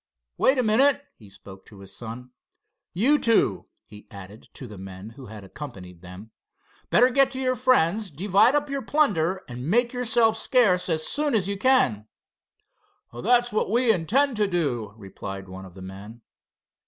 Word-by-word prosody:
"Wait 265 - +2
a 255 - +2
minute," 270 +6 +2
he 105 -3 -17
spoke 95 -1 -14
to 105 - -17
his 95 0 -10
son. 120 +2 -9 0.6
"You 265 +11 +2
two," 230 -1 +1 0.2
he 105 -1 -15
added 100 +2 -12
to 130 - -9
the 105 -5 -11
men 95 +2 -10
who 130 +1 -13
had 105 -1 -11
accompanied 95 - -10
them, 95 +5 -12 0.6
"better 250 +2 +4
get 270 +1 +3
to 260 - -5
your 255 -1 0
friends, 220 -5 +1
divide 200 - +2
up 295 0 0
your 275 -1 -4
plunder 190 - 0
and 125 +2 -6
make 235 +4 +1
yourselves 235 -3 +1
scarce 200 -9 +2
as 160 -1 0
soon 295 -3 0
as 195 -4 0
you 200 - -2
can." 195 - +1 1.1
"That's 240 - +1
what 215 - 0
we 235 +1 +3
intend 235 - 0
to 210 -1 +2
do," 125 - -2
replied 95 -1 -9
one 95 +1 -10
of 95 -1 -15
the 95 - -10
men. 100 +5 -11
175 Hz, 170 wpm, -24 LUFS, -, 1.1 s, better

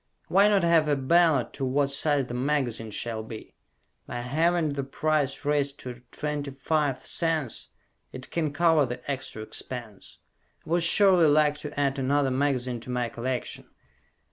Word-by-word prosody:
Why 195 +3 +5
not 200 -3 +3
have 165 -2 +4
a 145 - +2
ballot 150 0 +3
to 140 - -5
what 140 +2 +1
size 145 -1 +2
the 120 - -7
magazine 125 -4 -1
shall 110 +1 -3
be? 110 0 -10 0.5
By 120 - -4
having 160 +6 +1
the 140 -1 -3
price 145 0 -1
raised 145 -1 0
to 125 -1 -8
25 145 -1 -2
cents 160 -7 -2 0.4
it 130 0 -8
can 160 -3 -1
cover 160 -2 +3
the 120 +1 -7
extra 130 -5 -5
expense. 110 -2 -7 0.5
I - - -9
would 175 +1 +3
surely 180 0 +5
like 150 0 +4
to 150 -1 -6
add 140 -1 0
another 135 +1 +1
magazine 130 -2 0
to 115 - -11
my 125 -1 -1
collection. 120 +2 -4
140 Hz, 155 wpm, -26 LUFS, 125-155 Hz, 0.5 s, Why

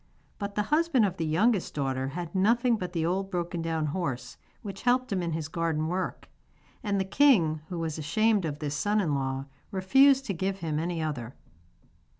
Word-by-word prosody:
But 200 -1 -4
the 210 - +1
husband 305 -7 +4
of 190 -2 -2
the 165 - -1
youngest 195 +5 +1
daughter 135 -2 -1
had 170 +4 -5
nothing 230 +5 +3
but 180 -5 -4
the 165 -2 -1
old 190 +3 -1
broken 175 -2 -2
down 165 -1 -1
horse 130 -7 -3 0.3
which 195 -3 -7
helped 250 -2 +2
him 185 - 0
in 170 -2 -2
his 160 -2 -3
garden 160 -1 -1
work; 185 +2 -3 0.5
and 205 -5 0
the 190 - 0
king, 190 - +4
who 175 - -4
was 160 -1 -3
ashamed 210 +7 +2
of 150 -3 -3
this 150 -2 -3
son 205 +8 +1
in 165 -8 +1
law, 135 -1 -2 0.2
refused 270 +8 +4
to 200 - -2
give 190 +2 -2
him 155 -4 -2
any 165 0 -2
other. 130 -6 -4
175 Hz, 190 wpm, -28 LUFS, 155-205 Hz, 0.5 s, husband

